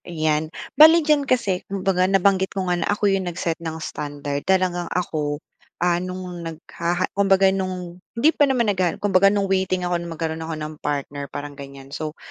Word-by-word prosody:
Ayan, 155 -2 0 0.2
bale 320 +1 +7
diyan 295 -3 +2
kasi 200 -8 +1
kumbaga 190 -1 +1
nabanggit 195 0 +3
ko 190 - 0
nga 180 - +1
na - - -1
ako 205 +1 +1
yung 190 -2 -1
nag-set 170 -1 -3
ng 160 -1 -4
standard. 145 -2 -4
Talagang 180 -2 +1
ako, 150 -5 -2 0.4
ah, 175 0 +1
nung 185 0 -5 0.2
naghaha 170 +2 -3
kumbaga 195 -1 +4
nung 185 -2 -4 0.2
hindi 290 +7 +5
pa 290 -1 +3
naman 250 -3 +2
naghahanap. 180 -3 0
Kumbaga 195 -1 +4
nung 200 -1 +1
waiting 190 -1 0
ako 175 -1 0
na 170 - -6
magkaroon 160 -1 -3
ako 160 0 -4
ng 155 0 -5
partner 140 -1 -3
parang 145 0 -6
gan'yan. 140 -1 -11
So, 155 0 -5
180 Hz, 180 wpm, -22 LUFS, 160-195 Hz, 0.4 s, bale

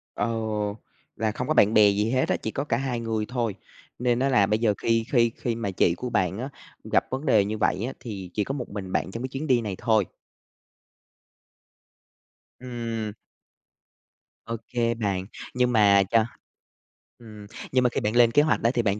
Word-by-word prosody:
Ờ, 115 +3 -1 0.8
là 110 0 0
không 125 +4 -4
có 155 - +2
bạn 105 -6 +4
bè 105 -1 +7
gì 105 +3 0
hết 130 0 +1
á, - - +3
chỉ 110 - -4
có 140 - -2
cả 120 -5 0
hai 130 -3 -2
người 110 -2 -2
thôi. 120 -5 -1 0.4
Nên 125 -1 +1
á 135 +1 +2
là 105 -6 +4
bây 105 +2 +1
giờ 110 -3 +2
khi 115 -1 +1
khi 115 -3 +4
khi 120 -2 -2
mà 100 -4 -3
chị 85 -1 +2
của 125 - -4
bạn 95 -2 0
á 130 +3 -4 0.3
gặp - - +1
vấn 135 +3 -4
đề 110 -8 +4
như 110 +1 -3
vậy 105 0 +1
á, 130 - -4
thì 100 -6 -7
chỉ 105 - 0
có 135 - -4
một 130 -4 -5
mình 100 -2 -6
bạn 95 - -1
trong 115 +4 -5
cái - - -1
chuyến 135 +4 -5
đi 125 -4 +3
này 105 -4 -4
thôi. 110 -4 +2 2.6
Ừm. 115 -4 -4 1.3
OK 115 +1 -2
bạn. 95 -3 -1 0.3
Nhưng 125 0 +2
mà 100 -3 +5
cho 115 -1 +4 0.9
ừm, 105 -3 -12 0.2
nhưng 130 -1 +3
mà 125 - +4
khi - - -2
bạn 105 +2 -1
lên 120 -1 +6
kế 145 - +5
hoạch 155 0 +1
á 115 - +4
thì 120 - +2
bạn 100 -1 0
115 Hz, 200 wpm, -25 LUFS, 105-125 Hz, 2.6 s, bè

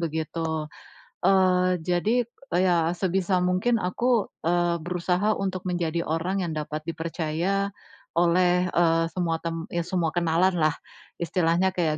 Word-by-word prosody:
begitu. 160 -1 -2 0.6
Eee, 185 -1 +4
jadi 205 +8 +1 0.3
ya 175 -2 +3
sebisa 185 0 0
mungkin 185 +6 +1
aku, 230 +5 +1 0.2
eee, 175 0 +2
berusaha 180 +4 +1
untuk 185 -2 -2
menjadi 170 -2 -1
orang 180 +4 -1
yang 160 - -3
dapat 155 0 -4
dipercaya 170 +4 -2 0.5
oleh, 180 +1 +3
eee, 165 -1 +3
semua 165 -3 0
tem 165 0 -3
ya 170 - 0
semua 170 -4 0
kenalanlah 170 -1 +2 0.4
istilahnya 170 +2 +1
kayak 160 -4 +1
175 Hz, 120 wpm, -25 LUFS, 165-185 Hz, 0.6 s, Eee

